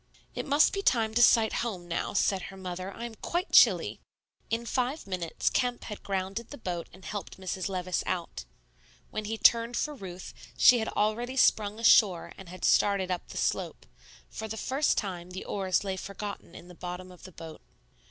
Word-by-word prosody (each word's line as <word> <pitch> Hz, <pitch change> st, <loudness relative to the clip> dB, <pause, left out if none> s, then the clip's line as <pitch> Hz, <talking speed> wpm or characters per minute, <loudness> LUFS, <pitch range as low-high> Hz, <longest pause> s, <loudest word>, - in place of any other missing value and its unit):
"It -, -, -4 dB
must 285 Hz, +2 st, +4 dB
be 395 Hz, -, -1 dB
time 225 Hz, -, +2 dB
to 240 Hz, -, +3 dB
sight 225 Hz, -2 st, +5 dB
home 190 Hz, -7 st, -4 dB
now," 170 Hz, -, -2 dB
said 195 Hz, -1 st, +2 dB
her 195 Hz, -, -11 dB
mother; 185 Hz, 0 st, -5 dB
"I 235 Hz, -, -7 dB
am 235 Hz, -, -7 dB
quite 345 Hz, -, -3 dB
chilly." -, -, +5 dB, 0.5 s
In 230 Hz, +1 st, -1 dB
five 255 Hz, +5 st, -1 dB
minutes 180 Hz, -4 st, -4 dB
Kemp 245 Hz, -1 st, 0 dB
had 210 Hz, -, -7 dB
grounded 195 Hz, +4 st, -3 dB
the 285 Hz, -, -8 dB
boat 175 Hz, -7 st, -4 dB
and 190 Hz, -, -15 dB
helped 205 Hz, -2 st, -6 dB
Mrs. 185 Hz, 0 st, -3 dB
Levice 185 Hz, -1 st, -1 dB
out. 170 Hz, -, -3 dB, 0.7 s
When 215 Hz, 0 st, -4 dB
he 225 Hz, +2 st, -3 dB
turned 230 Hz, +1 st, +4 dB
for 300 Hz, -, -1 dB
Ruth, 185 Hz, -8 st, -9 dB, 0.2 s
she 250 Hz, -1 st, +7 dB
had 220 Hz, -, -2 dB
already 235 Hz, +5 st, -1 dB
sprung 210 Hz, -4 st, +3 dB
ashore 205 Hz, -6 st, +4 dB
and 190 Hz, -3 st, -12 dB
had 185 Hz, +1 st, -5 dB
started 195 Hz, -2 st, +3 dB
up 180 Hz, -, -3 dB
the -, -, -9 dB
slope; -, -, -2 dB, 0.4 s
for 220 Hz, -, -6 dB
the 220 Hz, +1 st, -5 dB
first 270 Hz, +6 st, +1 dB
time 180 Hz, -4 st, -3 dB
the 185 Hz, +1 st, -7 dB
oars 190 Hz, -2 st, 0 dB
lay 190 Hz, -1 st, -3 dB
forgotten 200 Hz, -2 st, -7 dB
in 175 Hz, -, -11 dB
the 180 Hz, -, -12 dB
bottom 180 Hz, +1 st, -7 dB
of 180 Hz, -, -15 dB
the 185 Hz, -, -11 dB
boat. 160 Hz, -2 st, -10 dB
200 Hz, 190 wpm, -29 LUFS, 185-230 Hz, 0.7 s, she